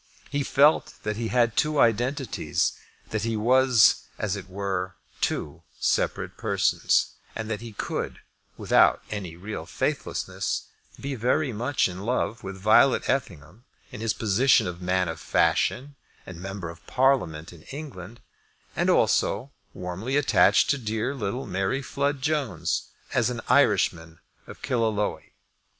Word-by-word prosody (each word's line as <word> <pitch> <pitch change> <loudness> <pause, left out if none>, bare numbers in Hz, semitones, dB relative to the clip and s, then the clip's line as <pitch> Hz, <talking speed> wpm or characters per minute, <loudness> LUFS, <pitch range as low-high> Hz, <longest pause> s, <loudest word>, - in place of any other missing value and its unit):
He 145 0 0
felt 145 +2 +3
that 105 0 -2
he 115 +1 -3
had 120 -2 +2
two 150 -1 +1
identities, 120 +2 +1 0.4
that 110 - -1
he 115 +1 -1
was, 125 0 +4
as 105 -2 -1
it 95 -1 -8
were, 95 -1 -3 0.3
two - - -2 0.2
separate - - 0
persons, - - +1 0.2
and 110 0 -4
that 105 0 -3
he 115 -1 -8
could, - - -4 0.4
without - - +4
any 95 -6 -5
real 100 +5 -6
faithlessness, - - -2 0.4
be 140 0 -4
very 130 +3 0
much 125 +6 +1
in 90 0 -7
love 115 +1 -1
with 95 0 -6
Violet 110 +7 +4
Effingham 100 - -3 0.3
in - - -8
his 115 -1 0
position 115 +5 +3
of 90 0 -5
man 90 0 +1
of 80 -1 -5
fashion 140 - +1 0.3
and 90 -2 -9
member 95 -3 -5
of 85 - -17
Parliament 125 - +1
in 85 - -14
England, 120 - -8 0.5
and - - +1
also 130 +6 +2 0.2
warmly 95 +10 -3
attached 145 0 +4
to 140 - 0
dear 110 +3 -2
little 125 +1 -3
Mary 95 +9 -1
Flood 140 +1 -2
Jones 140 - -1 0.3
as 120 0 +2
an 120 -2 -4
Irishman 85 -11 +2 0.3
of - - -12
Killaloe. 110 -4 0
110 Hz, 140 wpm, -26 LUFS, 95-130 Hz, 0.5 s, was